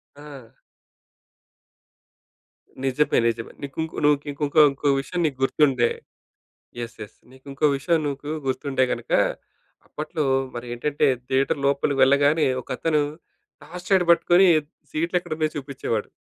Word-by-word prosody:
ఆ! 140 Hz, -5 st, -12 dB, 2.4 s
నిజమే 140 Hz, +3 st, +2 dB
నిజమే. 115 Hz, 0 st, -3 dB
నీకుంకొ 160 Hz, +3 st, -5 dB
నువ్వు 150 Hz, 0 st, +5 dB
కింకొ 145 Hz, 0 st, -6 dB
ఇంకో 155 Hz, +2 st, +4 dB
ఇంకో 140 Hz, +1 st, -1 dB
విషయం 175 Hz, +6 st, -5 dB
నీకు 145 Hz, -4 st, -2 dB
గుర్తుందే 135 Hz, -4 st, +3 dB, 0.9 s
యెస్, 115 Hz, 0 st, -7 dB
యెస్ 105 Hz, -, -10 dB
నీకుంకో 135 Hz, +3 st, -2 dB
విషయం 165 Hz, +4 st, +1 dB
నీకు 145 Hz, +1 st, -5 dB, 0.2 s
గుర్తుంటే 135 Hz, 0 st, 0 dB
గనక, -, -, -5 dB, 0.8 s
అప్పట్లో 155 Hz, 0 st, -4 dB, 0.3 s
మరి 120 Hz, 0 st, -6 dB
ఏంటంటే, 145 Hz, +4 st, 0 dB, 0.2 s
థియేటర్ 135 Hz, +2 st, +1 dB
లోపలికి 140 Hz, 0 st, +1 dB
వెళ్ళగానే, 145 Hz, +3 st, +3 dB
ఒకతను 150 Hz, +5 st, -1 dB, 0.6 s
టార్చ్ 180 Hz, +2 st, -10 dB
లైట్ 190 Hz, -2 st, +4 dB
పట్టుకొని, 175 Hz, +2 st, +5 dB, 0.4 s
సీట్లెక్కడున్నాయో 160 Hz, -1 st, -1 dB
చూపిచేవాడు. 135 Hz, -6 st, -4 dB
145 Hz, 110 wpm, -23 LUFS, 135-155 Hz, 2.4 s, నువ్వు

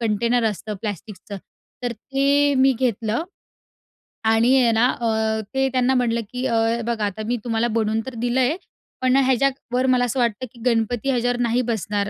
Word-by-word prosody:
container 230 Hz, +2 st, +1 dB
असतं 210 Hz, +1 st, -6 dB
प्लास्टिकचं 205 Hz, 0 st, -6 dB, 0.5 s
तर 245 Hz, -1 st, -1 dB
ते 280 Hz, +4 st, +1 dB
मी 265 Hz, +1 st, +4 dB
घेतलं 230 Hz, +1 st, 0 dB, 1.0 s
आणि 225 Hz, +4 st, +4 dB
आहे 240 Hz, -3 st, +4 dB
ना, 235 Hz, +3 st, +2 dB, 0.6 s
ते 270 Hz, 0 st, +2 dB
त्यांना 255 Hz, 0 st, +1 dB
म्हणलं 235 Hz, -2 st, +1 dB
की 250 Hz, +1 st, -3 dB
"अ, 230 Hz, -1 st, +1 dB
बघा, 230 Hz, -3 st, -1 dB
आता 205 Hz, +2 st, -4 dB
मी 245 Hz, +1 st, 0 dB
तुम्हाला 230 Hz, 0 st, 0 dB
बनवून 220 Hz, -1 st, 0 dB
तर 260 Hz, -, -7 dB
दिलंय 250 Hz, +5 st, +1 dB, 0.5 s
पण 255 Hz, 0 st, +3 dB
ह्याच्यावर 260 Hz, -1 st, +1 dB
मला 250 Hz, -1 st, +3 dB
असं 250 Hz, +2 st, -2 dB
वाटतं 235 Hz, +1 st, 0 dB
की 235 Hz, -, -16 dB
गणपती 235 Hz, +1 st, 0 dB
याच्यावर 245 Hz, -1 st, +1 dB
नाही 240 Hz, +1 st, +1 dB
बसणार, 205 Hz, -1 st, -1 dB
240 Hz, 160 wpm, -22 LUFS, 225-255 Hz, 1.0 s, मी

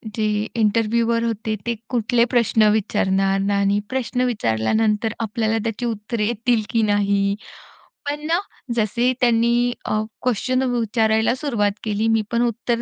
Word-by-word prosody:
जे 215 Hz, -1 st, 0 dB, 0.3 s
इंटरव्ह्यूवर 230 Hz, +1 st, +1 dB
होते 220 Hz, -1 st, -2 dB
ते 235 Hz, 0 st, -1 dB
कुठले 240 Hz, -1 st, +2 dB
प्रश्न 220 Hz, -2 st, +4 dB
विचारणार 195 Hz, -2 st, +1 dB, 0.2 s
आणि 200 Hz, +1 st, +2 dB
प्रश्न 255 Hz, -1 st, -2 dB
विचारल्यानंतर 210 Hz, -, 0 dB
आपल्याला 225 Hz, 0 st, -1 dB
त्याची 230 Hz, +1 st, -3 dB
उत्तरे 220 Hz, -1 st, -2 dB
येतील 235 Hz, 0 st, +1 dB
की 230 Hz, -, +1 dB
नाही? 200 Hz, -1 st, +1 dB, 0.7 s
पण 295 Hz, +1 st, -4 dB
ना, 340 Hz, +2 st, +2 dB, 0.4 s
जसे 235 Hz, +3 st, +1 dB
त्यांनी 240 Hz, +1 st, +3 dB
अ, 215 Hz, 0 st, 0 dB, 0.2 s
क्वेशन 255 Hz, +2 st, 0 dB
वि 245 Hz, -2 st, 0 dB
विचारायला 220 Hz, +1 st, +2 dB
सुरुवात 230 Hz, -8 st, 0 dB
केली, 215 Hz, 0 st, 0 dB
मी 225 Hz, -1 st, +3 dB
पण 235 Hz, 0 st, +1 dB
उत्तर 235 Hz, +1 st, -2 dB
225 Hz, 135 wpm, -21 LUFS, 210-240 Hz, 0.7 s, प्रश्न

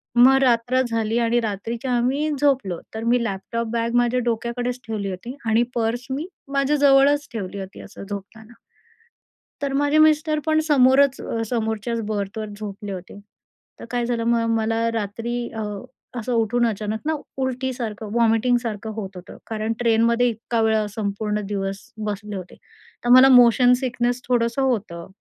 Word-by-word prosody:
मग 260 Hz, +3 st, +7 dB
रात्र 245 Hz, +1 st, +2 dB
झाली 225 Hz, 0 st, 0 dB
आणि 235 Hz, +1 st, +2 dB
रात्रीच्या 225 Hz, +4 st, -3 dB
आम्ही 275 Hz, +6 st, 0 dB
झोपलो. 255 Hz, -, +1 dB, 0.2 s
तर 220 Hz, -, -4 dB
मी 235 Hz, 0 st, +2 dB
लॅपटॉप 225 Hz, +3 st, -3 dB
बॅग 230 Hz, +1 st, -1 dB
माझ्या 245 Hz, +1 st, +2 dB
डोक्याकडेच 240 Hz, +2 st, -2 dB
ठेवली 205 Hz, -3 st, -3 dB
होती 235 Hz, +8 st, -7 dB
आणि 225 Hz, +2 st, +3 dB
पर्स 235 Hz, +2 st, -1 dB
मी 300 Hz, +6 st, -3 dB, 0.3 s
माझ्याजवळच 285 Hz, +1 st, +4 dB
ठेवली 200 Hz, -2 st, -5 dB
होती 190 Hz, 0 st, -8 dB
असं 200 Hz, -, -11 dB
झोपताना. 215 Hz, +3 st, -8 dB, 1.1 s
तर 275 Hz, -1 st, -1 dB
माझे 290 Hz, +2 st, +2 dB
मिस्टर 310 Hz, 0 st, +4 dB
पण 315 Hz, 0 st, +3 dB
समोरच 270 Hz, 0 st, +4 dB
अ, 225 Hz, 0 st, -3 dB
समोरच्याच 225 Hz, 0 st, -2 dB
बर्थवर 215 Hz, 0 st, -3 dB
झोपले 205 Hz, -1 st, -6 dB
होते. 185 Hz, +2 st, -8 dB, 0.6 s
तर -, -, -7 dB
काय 245 Hz, -1 st, -1 dB
झालं 235 Hz, -1 st, -1 dB
मग 230 Hz, -1 st, +2 dB
मला 225 Hz, +1 st, 0 dB
रात्री 230 Hz, +3 st, -3 dB
अ, 220 Hz, -1 st, -4 dB, 0.6 s
असं 245 Hz, +2 st, -3 dB
उठून 235 Hz, +1 st, +2 dB
अचानक 215 Hz, 0 st, -3 dB
ना 315 Hz, -, +2 dB, 0.3 s
उलटीसारखं 250 Hz, -5 st, -3 dB
वॉमिटिंगसारखं 230 Hz, -1 st, +1 dB
होत 195 Hz, -3 st, -6 dB
होतं. 180 Hz, -, -10 dB
कारण 220 Hz, 0 st, -2 dB
ट्रेनमध्ये 235 Hz, +1 st, +3 dB
इतका 230 Hz, +1 st, -2 dB
वेळा 220 Hz, -1 st, +2 dB
संपूर्ण 210 Hz, 0 st, -2 dB
दिवस 195 Hz, -1 st, -3 dB, 0.3 s
बसले 205 Hz, 0 st, -4 dB
होते. 180 Hz, -1 st, -8 dB, 0.5 s
तर -, -, -1 dB
मला 260 Hz, +1 st, +9 dB
मोशन 245 Hz, 0 st, +6 dB
सिकनेस 245 Hz, -1 st, -1 dB
थोडंसं 240 Hz, +2 st, +1 dB
होतं. 205 Hz, -10 st, -2 dB
230 Hz, 150 wpm, -22 LUFS, 215-250 Hz, 1.1 s, मला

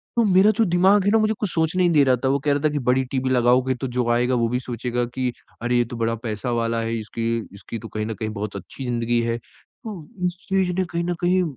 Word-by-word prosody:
तो 235 Hz, -, +4 dB
मेरा 195 Hz, +1 st, +5 dB
जो 225 Hz, -, +4 dB
दिमाग 190 Hz, +3 st, +4 dB
है -, -, +4 dB
ना 225 Hz, -, +5 dB
मुझे 215 Hz, 0 st, +2 dB
कुछ 210 Hz, -, -1 dB
सोचने 165 Hz, +3 st, +1 dB
ही 175 Hz, -, +4 dB
नहीं 165 Hz, -, +2 dB
दे 145 Hz, -, +7 dB
रहा 130 Hz, -, +5 dB
था -, -, +3 dB
वो 140 Hz, +1 st, +2 dB
कह 145 Hz, -, +3 dB
रहा 145 Hz, -, -1 dB
था 155 Hz, -, +4 dB
कि 145 Hz, -, 0 dB
बड़ी 130 Hz, 0 st, +2 dB
टीवी 130 Hz, -1 st, 0 dB
लगाओगे 125 Hz, +1 st, +3 dB
तो 130 Hz, -, -1 dB
जो 125 Hz, -1 st, -1 dB
आएगा 125 Hz, +2 st, +2 dB
वो 115 Hz, -1 st, +2 dB
भी 125 Hz, +1 st, 0 dB
सोचेगा 120 Hz, 0 st, -2 dB
कि, 125 Hz, +1 st, -2 dB, 0.3 s
अरे! 120 Hz, +1 st, +1 dB
ये 120 Hz, -, +3 dB
तो 120 Hz, +1 st, -8 dB
बड़ा 115 Hz, 0 st, 0 dB
पैसा 115 Hz, +1 st, -4 dB
वाला 115 Hz, -1 st, 0 dB
है 115 Hz, 0 st, -2 dB
इसकी 115 Hz, +2 st, -2 dB, 0.2 s
इसकी 105 Hz, +3 st, -7 dB
तो 115 Hz, -, -8 dB
कहीं 110 Hz, 0 st, -3 dB
न 110 Hz, -, -3 dB
कहीं 110 Hz, +1 st, -4 dB
बहुत 105 Hz, -1 st, -5 dB
अच्छी 100 Hz, +7 st, -7 dB
ज़िंदगी 120 Hz, -1 st, 0 dB
है। 115 Hz, 0 st, -1 dB
तो 215 Hz, -, -12 dB, 0.3 s
उस 175 Hz, 0 st, -5 dB
चीज़ 190 Hz, -2 st, +2 dB
ने 185 Hz, -, +2 dB
कहीं 170 Hz, -1 st, -3 dB
ना 175 Hz, +1 st, -1 dB
कहीं 180 Hz, +1 st, +3 dB
125 Hz, 275 wpm, -23 LUFS, 115-175 Hz, 0.3 s, दे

